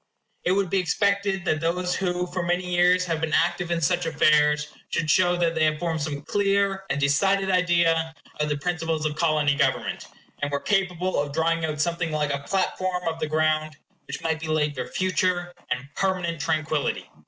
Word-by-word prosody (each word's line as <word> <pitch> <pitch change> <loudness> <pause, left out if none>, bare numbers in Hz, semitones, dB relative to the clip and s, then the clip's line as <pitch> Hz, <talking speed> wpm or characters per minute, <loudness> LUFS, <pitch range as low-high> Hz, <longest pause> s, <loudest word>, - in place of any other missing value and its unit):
It 180 - +2
would 195 -2 0
be 195 - +3
expected 200 +1 0
that 155 -3 +1
those 180 +2 0
who 180 -1 -1
for 180 - -1
many 175 +1 0
years 180 +1 +4
had 165 -2 -2
been 160 -1 -2
active 175 -1 +1
in 170 -1 0
such 175 +2 +1
affairs 150 -1 +3 0.2
should 155 -2 0
show 180 0 +4
that 170 -1 +1
they 160 -1 +1
had 155 0 +1
formed 165 -1 -2
some 145 -1 -4
clear 195 +1 +1
and 140 - -1
decided 190 +8 +2
idea 170 -3 +2 0.2
of 150 0 0
the 145 - 0
principles 165 0 -2
of 150 -1 -1
Colony 155 -3 +2
government; 140 -2 -1 0.3
and 145 0 -1
were 140 - 0
capable 185 -3 0
of 145 -1 -5
drawing 165 +1 +1
out 155 -1 -4
something 170 +1 -1
like 150 -2 0
a 140 - -2
platform 185 +2 -1
of 165 0 -2
the 155 - -1
ground 155 0 0 0.3
which 140 - -6
might 160 -1 0
be 160 - -6
laid 155 -1 +1
for 130 - -5
future 185 -1 0 0.2
and 125 +2 -2
permanent 180 -4 -1
tranquillity. 155 -2 -1
165 Hz, 190 wpm, -25 LUFS, 155-180 Hz, 0.3 s, years